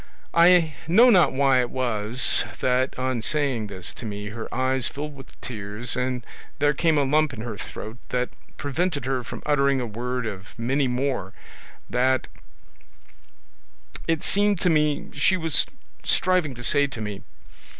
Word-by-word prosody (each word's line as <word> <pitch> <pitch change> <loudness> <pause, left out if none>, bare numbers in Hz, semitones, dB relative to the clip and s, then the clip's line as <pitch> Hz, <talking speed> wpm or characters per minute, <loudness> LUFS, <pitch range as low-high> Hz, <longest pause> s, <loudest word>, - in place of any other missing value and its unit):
I 170 -2 +5
know 230 +9 +6
not 180 -6 +5
why 135 -1 +3
it 120 - -2
was 120 -1 +2 0.2
that 130 +1 +1
on 130 -2 -1
saying 135 -5 0
this 95 -3 -3
to - - -9
me 105 0 -5
her 110 +1 -7
eyes 130 0 +1
filled 150 +1 -6
with 135 -1 -14
tears, 110 0 -2
and 125 -1 -2 0.3
there 145 0 +3
came 160 +1 +2
a 145 - +3
lump 150 +2 +2
in 110 - -7
her 115 -2 -5
throat 110 +3 -8
that 125 0 -1 0.3
prevented 145 0 -2
her 130 -1 -1
from - - -8
uttering 140 -2 +2
a 125 - -2
word 120 +2 -3
of 100 -3 -7
many 130 +4 0
more 125 -6 -2 0.5
that 130 +1 +1 1.8
it 165 -2 0
seemed 205 -1 +2
to 180 - +3
me 150 -2 +1
she 180 +6 +2
was 160 -5 +4 0.4
striving 180 -7 +1
to 120 - -8
say 145 +3 +3
to 130 -4 -8
me. 105 -2 -5
130 Hz, 160 wpm, -24 LUFS, 120-150 Hz, 1.8 s, know